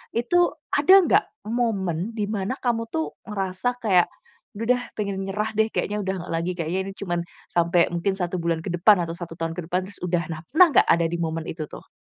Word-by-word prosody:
itu 350 +10 +3 0.2
ada 290 +7 +5
enggak, 390 +4 +3 0.2
momen 215 -5 -1
di 210 - -1
mana 200 +3 -1
kamu 235 -2 0
tuh, 320 0 -2
ngerasa 195 +3 -1
kayak, 185 -5 +5 0.5
"Udah 230 +4 +2
deh, 245 - -5 0.2
pengen 200 -2 -2
nyerah 210 +3 -2
deh, 220 0 +4
kayaknya 210 - -1
udah 190 - -1
nggak 175 - -6
lagi. 170 +2 -1
Kayaknya 170 +2 -1
ini - - -7
cuman 175 -3 -2 0.3
sampai, 170 0 +3
mungkin 180 +3 0
1 180 -1 -2
bulan 165 -1 -1
ke - - -3
depan, 180 +2 +5
atau 165 0 -4
1 170 -2 -7
tahun 165 0 -2
ke 175 - -4
depan, 180 +1 0
terus 205 - -1
udah." 175 -1 0
Nah, 155 - -5
pernah 350 +4 +7
enggak - - +6
ada 170 0 +4
di 170 - -2
momen 160 0 -2
itu 160 -1 -4
tuh? - - -11
190 Hz, 215 wpm, -24 LUFS, 170-225 Hz, 0.5 s, pernah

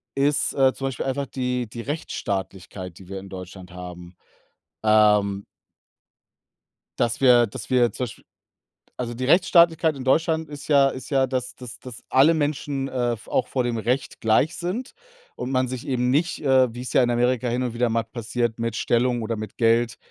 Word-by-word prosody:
ist, 145 +1 +1
äh, 135 -1 +3
zum 135 - -4
Beispiel 135 - -4
einfach 140 +1 -1
die 125 -2 -2
die 115 +2 -7
Rechtsstaatlichkeit, 95 - -5
die 95 - -14
wir 95 0 -5
in 95 - -11
Deutschland 95 -1 -9
haben. 90 0 -9 0.7
Ähm 105 -2 +3 1.5
dass 120 +1 0
wir 120 -3 +6
dass 100 - -9
wir 125 -2 +3
zum 125 - -3
Beispiel 115 - -10 0.7
Also, 120 -1 -3
die 125 +2 -4
Rechtsstaatlichkeit 170 -1 +4
in 130 - -7
Deutschland 160 +3 +1
ist 145 -1 -9
ja 140 -2 +5
ist 130 - -8
ja, 135 -1 +3
dass 130 -1 -3
dass 125 -2 -10
dass 125 -2 -10
alle 140 +5 +5
Menschen, 145 -2 -2
äh, 120 -2 -1
v 110 - -16
auch 125 - +1
vor 130 -2 -1
dem 120 -1 -1
Recht 125 +5 -2
gleich 115 +9 +2
sind 190 +9 -4 0.4
und 125 - -4
man 130 -1 +1
sich 125 -1 -6
eben 125 -1 +1
nicht, 160 +6 0
äh, 130 -3 +4
wie's 125 +1 -6
ja - - +5
in 120 - +2
Amerika 125 +1 +1
hin 125 +2 -1
und 125 - -2
wieder 120 0 +1
mal 115 0 0
passiert, 115 0 -3
mit 115 -1 -2
Stellung 120 0 +1
oder 115 +1 -2
mit 110 -1 -7
Geld, 115 0 +2
125 Hz, 185 wpm, -24 LUFS, 115-135 Hz, 1.5 s, wir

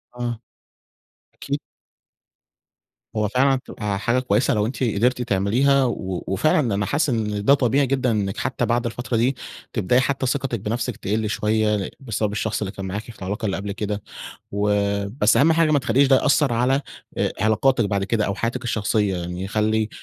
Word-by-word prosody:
آه، 120 -2 -3 0.9
أكيد. - - -4 1.6
هو 105 -1 +1
فعلًا 135 +5 +3
تبقى 105 -2 -3
حاجة 120 +5 +1
كويسة 130 0 +1
لو 105 -1 +1
أنتِ 130 +3 -3
قدرتِ 125 +2 +1
تعمليها، 125 +6 +2
و 95 -7 -3
وفعلًا 115 +3 +2
أنا 100 +1 0
حاسس 145 +7 +1
إن 105 -4 -1
ده 140 - +7
طبيعي 135 +1 +2
جدًا 130 -2 +1
إنِك 100 -3 -1
حتى 130 +1 -1
بعد 120 +1 0
الفترة 120 +1 -2
دي، 125 +4 +2 0.4
تبدأي 115 +3 +2
حتى 135 +1 -1
ثقتِك 130 -2 -1
بنفسِك 115 +3 -3
تقل 105 +2 -1
شوية 105 +1 +1
لإ 100 -3 -2
بسبب 110 -5 -2
الشخص 110 +1 -2
اللي 100 -2 -2
كان 95 -1 -7
معاكِ 95 +2 -3
في 115 -1 -13
العلاقة 100 +4 -4
اللي 100 - -1
قبل 100 +1 -4
كده، 105 0 -3 0.5
و 100 +1 0 0.5
بس 105 - +5
أهم 160 +4 +5
حاجة 160 -1 +3
ما 145 - +4
تخليش 135 +2 +3
ده 135 - +6
يأثّر 140 -1 +3
على 130 +4 +2 0.4
آآ - - +1
علاقاتِك 115 +3 +3
بعد 100 -1 0
كده 105 +1 0
أو 100 - -2
حياتِك 120 +5 -2
الشخصية، 105 -4 0
يعني 90 +2 -4
خلّي 110 +1 0
110 Hz, 175 wpm, -22 LUFS, 105-130 Hz, 1.6 s, ده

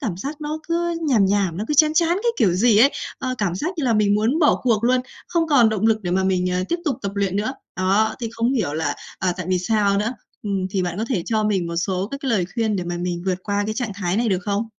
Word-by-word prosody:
cảm 220 - -3
giác 285 - -6
nó 305 +1 -3
cứ 340 0 0
nhàm 230 -7 +4
nhàm, 195 -4 +1
nó 205 - -3
cứ 300 - 0
chán 305 +1 +5
chán 335 0 +3
cái 405 +7 +1
kiểu 190 - +3
gì 210 +3 +4
ấy, 265 +6 +6 0.3
ơ, 255 - -2
cảm 195 -5 0
giác 300 - -2
như 300 - 0
là 235 -3 +2
mình 210 -1 +3
muốn 225 +8 +1
bỏ 300 -3 +3
cuộc 230 -3 +2
luôn, 250 +1 +3 0.3
không 335 -2 +1
còn 255 -7 +5
động 220 0 0
lực 220 -1 +2
để 175 - -2
mà 190 +1 +1
mình, 180 -1 +1
à, 180 0 0
tiếp 345 - +1
tục 285 -7 0
tập 200 - -3
luyện 200 -2 -1
nữa. 215 +5 -1 0.2
Đó, 200 +4 +2
thì 230 - -2
không 235 +2 0
hiểu 210 - 0
là, 155 -2 -1 0.2
à, 185 -1 +1
tại 185 -3 -5
vì 185 -1 +2
sao 200 +1 +1
nữa? 215 +4 -1 0.3
Ừm, 195 -3 -1
thì 190 -1 0
bạn 175 +1 -3
có 220 - 0
thể 200 -10 0
cho 220 -2 0
mình 195 -5 0
một 170 0 -4
số 185 +2 -1
các 275 - -5
cái 275 - -3
lời 205 -6 +2
khuyên 225 -3 0
để 180 - -3
mà 175 0 -3
mình 175 -1 -3
vượt 185 -1 0
qua 205 0 -1
cái 215 - -2
trạng 225 -3 -3
thái 190 -2 -1
này 235 +1 +1
được 190 -3 +1
không? 205 +2 -1
210 Hz, 290 wpm, -22 LUFS, 185-245 Hz, 0.3 s, ấy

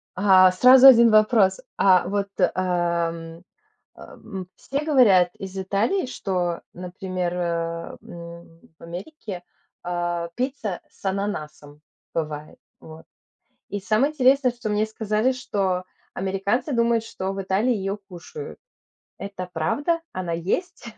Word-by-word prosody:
А, 185 -1 +6
сразу 255 +7 +8
1 235 -3 +8
вопрос. 215 -2 +4 0.2
А 185 -2 +4
вот, 200 0 -1 0.3
ам, 170 -2 -2 0.5
эм, 190 -4 -9
все 280 +2 -4
говорят 205 - +5
из 195 0 -8
Италии, 205 - 0
что, 180 -7 -2
например, 180 0 -4
э, 170 -1 -3
м, 170 -1 -12 0.2
в - - -21
Америке, 180 - -8 0.4
а, 175 -1 -2
пицца 250 -7 -3
с - - -26
ананасом 155 -7 -4 0.3
бывает, 155 -2 -4 0.2
вот. 160 0 -12 0.6
И 205 - -4
самое 225 +9 +1
интересное, 265 -2 +3
что 240 -2 -6
мне 210 +1 +1
сказали, 220 +3 0
что 195 -7 -2 0.3
американцы 200 +8 -1
думают, 235 -2 +2
что 190 -3 -4
в 195 0 -4
Италии 195 +6 +1
её 195 0 -3
кушают. 440 - -9 0.6
Это 195 -2 -7
правда? 290 - 0
Она 180 -2 -4
есть? 190 - -3
190 Hz, 120 wpm, -23 LUFS, 175-230 Hz, 0.6 s, сразу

